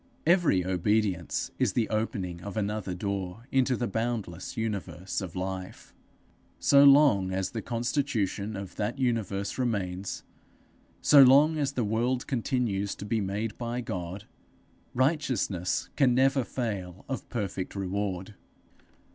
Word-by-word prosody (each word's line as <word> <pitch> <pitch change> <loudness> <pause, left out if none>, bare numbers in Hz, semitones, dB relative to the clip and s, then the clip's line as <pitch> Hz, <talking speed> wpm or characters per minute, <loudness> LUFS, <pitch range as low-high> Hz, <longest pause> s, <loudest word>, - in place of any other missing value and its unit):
Every 165 - +3
obedience 95 -1 0
is - - +2
the 115 - +1
opening 95 -5 -2
of 100 +2 -7
another 105 -3 -2
door 100 +2 -4
into 130 -1 +2
the 120 - -1
boundless 110 -4 -3
universe 95 -5 -3
of 90 -4 -7
life. 95 0 -5 0.7
So 140 0 +6
long 140 -10 +6
as 95 0 -2
the 115 - -4
constitution 115 -4 -1
of 95 -2 -7
that 110 +5 -2
universe 110 -5 -1
remains, 100 -6 -2 0.8
so 145 -2 +8
long 140 +5 +7
as 140 -2 0
the 125 - 0
world 120 +4 0
continues 115 -6 -1
to - - -8
be 110 +1 0
made 100 +3 -3
by 120 +1 -3
God, 95 -2 -5 0.7
righteousness 130 - 0
can 130 -4 +4
never 135 +1 +3
fail 100 -8 -4
of 135 - -5
perfect 100 -6 -4
reward. 100 0 -3
105 Hz, 130 wpm, -28 LUFS, 95-125 Hz, 0.8 s, so